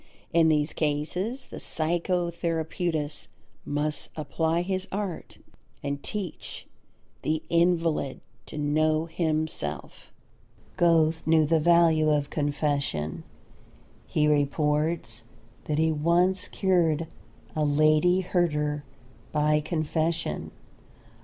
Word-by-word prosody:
In 165 -1 +5
these 150 0 +1
cases 165 - -2
the - - -9
psychotherapeutist 170 -2 -1 0.4
must 150 +1 -1
apply 160 +3 0
his 190 +1 -2
art 195 -3 -4 0.5
and 140 0 -3
teach 200 -6 -6 0.6
the 155 +1 -1
invalid 170 -4 +1 0.3
to - - -8
know 155 +2 +1
himself. 155 - -3 0.6
Goethe 165 -2 +3
knew 160 -1 +5
the 160 +1 +3
value 165 -1 +4
of 145 -1 +1
confession. 145 - -1 0.8
He 150 -1 +2
reports 150 -1 0 0.4
that 150 - -1
he 160 +1 +3
once 170 +5 +2
cured 170 -5 +1 0.5
a 155 - +1
Lady 155 +5 +4
Herder 150 -5 0 0.5
by 150 0 +2
confession. 160 +1 -1
155 Hz, 95 wpm, -27 LUFS, 150-170 Hz, 0.8 s, In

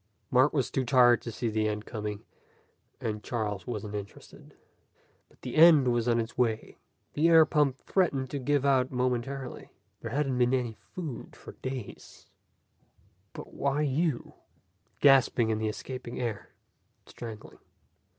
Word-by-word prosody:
Mark 130 +3 +4
was 135 -5 -1
too 135 - 0
tired 120 -1 +5
to 115 - -6
see 115 - -3
the 110 -1 0
end 105 0 -3
coming, 105 -2 -5 0.8
and 105 -1 -4
Charles 105 -4 -3
wasn't 105 -3 -5
interested. 100 -1 -9 0.7
But - - -28
the 125 - -5
end 155 -5 +7
was 120 0 0
on 120 -1 +3
its 115 +1 -4
way. 115 -3 -1 0.3
The 160 +3 +3
air 165 -1 +7
pump 145 -4 +1
threatened 140 -9 0
to 145 - -3
give 140 +1 0
out 130 -2 +3
momentarily. 125 +1 -3 0.3
There 115 - -6
hadn't 135 0 -1
been 125 +1 +3
any 120 -3 -2 0.2
food 160 -9 -6
for - - -11
days. 130 -4 -7 1.1
"But - - -10
why 140 +2 0
you?" 150 -1 -1 0.7
Gasping 130 -5 +4
in 110 - -1
the 110 0 -1
escaping 125 +2 -7
air. 115 -4 -4 0.6
Strangling. 110 -3 -10
125 Hz, 145 wpm, -29 LUFS, 115-140 Hz, 1.1 s, end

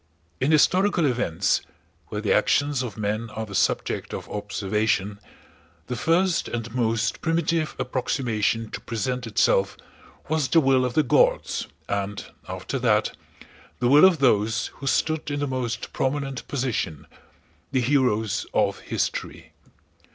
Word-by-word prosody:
In 135 +4 +2
historical 180 +3 +4
events 125 - +1 0.5
(where - - -4
the - - +2
actions 145 -2 +2
of 115 -5 -5
men 110 +2 -2
are 110 0 -5
the 100 - -10
subject 90 - 0
of - - -7
observation) 105 0 -1 0.7
the 125 - -4
first 170 +7 +1
and 115 -1 -5
most 115 -2 0
primitive 165 -1 0
approximation 115 -4 -1
to - - -6
present 125 +2 -3
itself 100 -2 +2 0.5
was 155 -3 +1
the 150 +6 +4
will 135 -3 +3
of 125 -1 -3
the 155 - +4
gods - - +2 0.2
and, 100 0 -3 0.2
after - - -4
that, - - +2 0.6
the 120 0 +1
will 145 +6 +8
of 185 -3 +5
those 115 -3 +2
who 135 - -6
stood 155 +2 0
in 145 0 -2
the 145 - 0
most 130 -3 -3
prominent 135 -1 -2
position—the 125 - -5
heroes 120 -5 +1
of - - +2
history. - - -4
125 Hz, 135 wpm, -24 LUFS, 110-145 Hz, 0.7 s, will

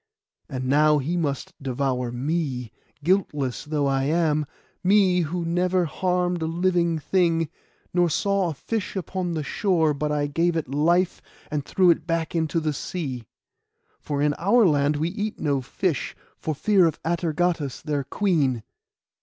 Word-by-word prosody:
And 130 -3 -4
now 150 +3 +4
he 150 +5 -1
must 165 +2 -2
devour 130 -2 -1
me, 130 -3 -2 0.3
guiltless 150 -8 0
though 150 -1 0
I 135 -1 +1
am—me 170 +5 +1
who 170 +2 -2
never 180 +1 +1
harmed 180 +1 0
a 160 - 0
living 170 0 +1
thing, 165 -1 +1 0.4
nor 175 -1 +3
saw 200 +1 +1
a 155 - -5
fish 210 - -3
upon 180 -1 -3
the 155 - -2
shore 165 -3 +1
but 150 +1 -2
I 145 -1 +1
gave 165 +4 +1
it 160 - -2
life, 170 +7 +1 0.3
and 150 -2 -1
threw 180 +4 +4
it 165 -1 -1
back 165 -1 -1
into 165 0 0
the 155 -2 -1
sea; 135 -6 -4 0.7
for 145 -1 -2
in 150 0 +3
our 215 +6 +4
land 145 -3 +3
we 160 +3 0
eat 205 +3 -4
no 140 -3 0
fish, 165 +5 -2 0.2
for 155 - -3
fear 190 +3 +4
of 160 - -3
Atergatis 165 -3 -1
their 145 -2 -1
queen. 140 - 0
160 Hz, 155 wpm, -24 LUFS, 145-180 Hz, 0.7 s, now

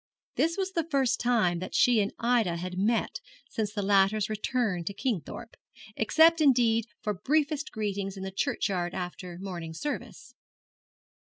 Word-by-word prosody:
This 330 +3 +1
was 385 -1 -1
the 330 -3 -2
first 270 -5 +2
time 220 -8 +2
that 185 - -6
she 240 -3 +5
and 200 - -1
Ida 230 -8 +1
had 180 +1 -5
met 230 - 0 0.3
since 215 -6 -3
the 210 -1 -3
latter's 200 +2 +3
return 215 -4 -1
to 200 - -4
Kingthorpe, 225 - -4 0.4
except 320 +8 +4
indeed 235 -6 +4 0.2
for 210 - 0
briefest 300 - 0
greetings 200 -2 -3
in 190 - -6
the 190 - -4
churchyard 185 -2 -1
after 180 -1 -6
morning 175 -4 -6
service. 270 - -5
215 Hz, 150 wpm, -28 LUFS, 190-250 Hz, 0.4 s, she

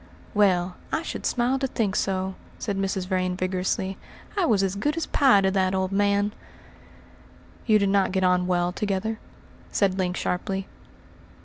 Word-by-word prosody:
"Well, 185 -4 +2
I 320 - 0
should - - -3
smile 250 +2 +1
to 270 - 0
think 210 -5 -1
so," 190 -1 0 0.2
said 205 -3 -3
Mrs. 195 -1 -1
Vrain 185 -1 0
vigorously. 185 +1 -1 0.4
"I 390 -4 +2
was 205 -5 +3
as 190 -1 0
good 295 +10 -1
as 330 - -1
pie 260 -8 +4
to 190 0 +2
that 190 -1 +1
old 190 0 0
man." 205 +1 +2 1.3
"You 215 -2 +6
did 200 -1 +2
not 195 -1 +2
get 190 0 0
on 180 0 +3
well 175 -1 +1
together?" 210 +3 -2 0.5
said 195 -2 +1
Link 180 -1 0
sharply. 190 +2 -2
195 Hz, 165 wpm, -25 LUFS, 185-205 Hz, 1.3 s, You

